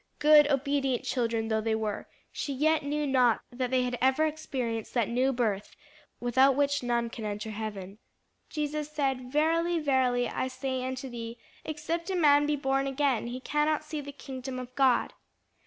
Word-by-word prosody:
Good, 295 Hz, 0 st, +6 dB
obedient 275 Hz, -2 st, 0 dB
children 230 Hz, -3 st, -1 dB
though 220 Hz, 0 st, +1 dB
they 220 Hz, 0 st, 0 dB
were, 215 Hz, -2 st, -3 dB, 0.2 s
she 280 Hz, -, -3 dB
yet 310 Hz, +4 st, +2 dB
knew 295 Hz, +1 st, -1 dB
not 250 Hz, -4 st, +3 dB
that 250 Hz, 0 st, -2 dB
they 255 Hz, 0 st, +2 dB
had 245 Hz, -1 st, -2 dB
ever 265 Hz, +4 st, +3 dB
experienced 255 Hz, -8 st, -3 dB
that 235 Hz, -4 st, +2 dB
new 255 Hz, +3 st, +2 dB
birth 220 Hz, -5 st, -2 dB, 0.4 s
without 260 Hz, +3 st, +4 dB
which 285 Hz, 0 st, +1 dB
none 235 Hz, -1 st, -1 dB
can 230 Hz, -, -7 dB
enter 210 Hz, +1 st, -4 dB
heaven. 205 Hz, -2 st, -6 dB, 0.5 s
Jesus 300 Hz, 0 st, -3 dB
said, 270 Hz, -4 st, -2 dB
"Verily, 330 Hz, +3 st, +2 dB
verily, 260 Hz, -5 st, +2 dB
I 260 Hz, -, -2 dB
say 260 Hz, 0 st, -3 dB
unto 260 Hz, +1 st, -4 dB
thee, 235 Hz, -1 st, -7 dB, 0.3 s
Except 320 Hz, +3 st, -3 dB
a 380 Hz, -, -1 dB
man 290 Hz, -4 st, +5 dB
be 300 Hz, -, +1 dB
born 270 Hz, -1 st, 0 dB
again, 270 Hz, -4 st, 0 dB
he 245 Hz, +2 st, -5 dB
cannot 300 Hz, +3 st, 0 dB
see 305 Hz, 0 st, -5 dB
the 285 Hz, 0 st, -8 dB
kingdom 265 Hz, -2 st, -7 dB
of 250 Hz, 0 st, -7 dB
God." 260 Hz, -2 st, +2 dB
265 Hz, 170 wpm, -29 LUFS, 240-290 Hz, 0.5 s, Good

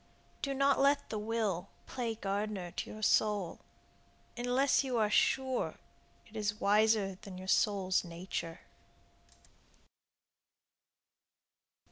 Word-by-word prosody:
Do 275 Hz, -1 st, -2 dB
not 275 Hz, +1 st, +3 dB
let 280 Hz, +1 st, +3 dB
the 215 Hz, -, -2 dB
will 210 Hz, -4 st, -1 dB, 0.2 s
play 235 Hz, -3 st, -3 dB
gardener 200 Hz, -3 st, -3 dB
to -, -, -5 dB
your 215 Hz, 0 st, -8 dB
soul 205 Hz, -5 st, +2 dB, 0.8 s
Unless 250 Hz, +3 st, +2 dB
you 255 Hz, -3 st, -1 dB
are 215 Hz, -2 st, +2 dB
sure 260 Hz, +3 st, +2 dB, 0.5 s
It 220 Hz, -, -18 dB
is 210 Hz, -1 st, -2 dB
wiser 205 Hz, -2 st, +3 dB
than 190 Hz, -2 st, -9 dB
your 185 Hz, 0 st, -8 dB
soul's 190 Hz, -2 st, +2 dB
nature. 170 Hz, -1 st, -5 dB
215 Hz, 105 wpm, -33 LUFS, 195-245 Hz, 0.8 s, not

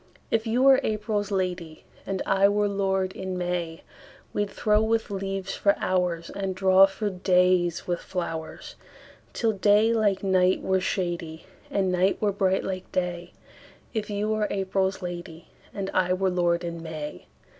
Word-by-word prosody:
If 225 Hz, 0 st, +1 dB
you 240 Hz, +3 st, +2 dB
were 270 Hz, -1 st, +7 dB
April's 210 Hz, -1 st, -1 dB
lady, 180 Hz, -5 st, -3 dB, 0.2 s
And 195 Hz, -1 st, -2 dB
I 195 Hz, +1 st, +4 dB
were 205 Hz, 0 st, +1 dB
lord 190 Hz, -1 st, 0 dB
in 185 Hz, -1 st, -5 dB
May, 175 Hz, -2 st, -3 dB, 0.5 s
We'd 205 Hz, -1 st, -1 dB
throw 210 Hz, +1 st, +2 dB
with 220 Hz, -1 st, 0 dB
leaves 195 Hz, 0 st, -3 dB
for 200 Hz, -, +3 dB
hoursAnd 185 Hz, +1 st, -2 dB
draw 190 Hz, 0 st, +6 dB
for 205 Hz, +1 st, -3 dB
days 180 Hz, -2 st, +2 dB
with 175 Hz, -1 st, -1 dB
flowers, 165 Hz, -3 st, -5 dB, 0.6 s
Till 225 Hz, -2 st, +1 dB
day 210 Hz, +2 st, +3 dB
like 205 Hz, -4 st, +1 dB
night 185 Hz, -1 st, +2 dB
were 190 Hz, 0 st, +2 dB
shadyAnd 175 Hz, -4 st, -3 dB, 0.4 s
night 185 Hz, +1 st, +1 dB
were 210 Hz, -1 st, +1 dB
bright 190 Hz, -1 st, +1 dB
like 185 Hz, -1 st, -5 dB
day; 175 Hz, -1 st, -3 dB, 0.6 s
If 215 Hz, -2 st, -3 dB
you 205 Hz, +1 st, -1 dB
were 215 Hz, -1 st, +1 dB
April's 190 Hz, 0 st, -1 dB
lady, 175 Hz, -2 st, -7 dB, 0.2 s
And 195 Hz, -1 st, -4 dB
I 180 Hz, -1 st, +2 dB
were 190 Hz, 0 st, +1 dB
lord 175 Hz, -1 st, +1 dB
in 170 Hz, -1 st, -5 dB
May. 155 Hz, -, -7 dB
190 Hz, 150 wpm, -26 LUFS, 180-205 Hz, 0.6 s, were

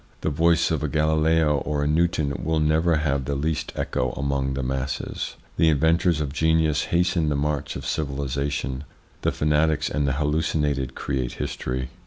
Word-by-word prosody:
The 80 Hz, -, 0 dB
voice 80 Hz, +2 st, +3 dB
of 80 Hz, -, 0 dB
a 75 Hz, -, 0 dB
Galileo 80 Hz, 0 st, +2 dB
or 75 Hz, +1 st, -1 dB
a -, -, +1 dB
Newton 80 Hz, -2 st, +1 dB
will 80 Hz, 0 st, +1 dB
never 80 Hz, +2 st, +3 dB
have 70 Hz, -3 st, 0 dB
the 70 Hz, -, -1 dB
least 75 Hz, +3 st, -2 dB
echo 65 Hz, 0 st, -1 dB
among 70 Hz, -1 st, -1 dB
the 70 Hz, -, -2 dB
masses. 65 Hz, +1 st, -3 dB, 0.2 s
The 80 Hz, -, +5 dB
inventors 80 Hz, +2 st, +3 dB
of 70 Hz, -2 st, -3 dB
genius 80 Hz, -1 st, +2 dB
hasten 85 Hz, -2 st, +1 dB
the 75 Hz, -, 0 dB
march 75 Hz, 0 st, -1 dB
of -, -, -6 dB
civilisation. 70 Hz, -1 st, -2 dB, 0.4 s
The -, -, +1 dB
fanatics 75 Hz, 0 st, +1 dB
and 75 Hz, 0 st, 0 dB
the 70 Hz, -, +1 dB
hallucinated 75 Hz, -2 st, 0 dB
create 65 Hz, -3 st, -2 dB
history. 65 Hz, 0 st, -4 dB
75 Hz, 165 wpm, -24 LUFS, 70-80 Hz, 0.4 s, The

